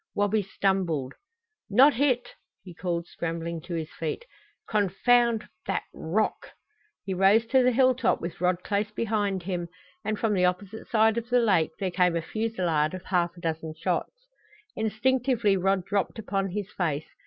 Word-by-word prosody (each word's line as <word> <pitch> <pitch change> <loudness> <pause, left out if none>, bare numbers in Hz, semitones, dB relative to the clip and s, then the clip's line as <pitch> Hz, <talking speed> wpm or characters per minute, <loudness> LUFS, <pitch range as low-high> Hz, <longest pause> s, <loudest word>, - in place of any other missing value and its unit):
Wabi 205 +1 +2
stumbled. 185 -8 -1 0.6
"Not 265 +8 +6
hit!" 250 -1 +1 0.3
he 180 - -10
called, 170 0 -3
scrambling 165 -1 -4
to 170 +2 -6
his 160 -1 -4
feet. 165 - -4 0.4
"Confound 225 +3 +2 0.2
that - - -1
rock!" 205 +7 -2 0.5
He 195 - -2
rose 195 +5 +4
to 260 -1 +6
the 250 0 +4
hilltop 255 0 +3
with 170 0 -6
Rod 180 0 +1
close 205 0 -1
behind 205 -4 -1
him, 175 -2 -3 0.3
and 215 +1 -1
from 220 -1 +1
the 185 -2 +2
opposite 190 +4 -3
side 225 0 +3
of 235 +1 -11
the 245 0 +4
lake 180 -9 +2
there 190 -2 -1
came 180 -1 +2
a 170 - 0
fusillade 180 -8 -1
of 185 - -8
half 175 -2 0
a - - -11
dozen 160 -1 -3
shots. - - -3 0.5
Instinctively 235 0 +1
Rod 190 -1 +1
dropped 200 +2 -1
upon 195 -3 -2
his 205 +1 -4
face. 155 -4 -1
195 Hz, 160 wpm, -27 LUFS, 175-225 Hz, 0.6 s, Not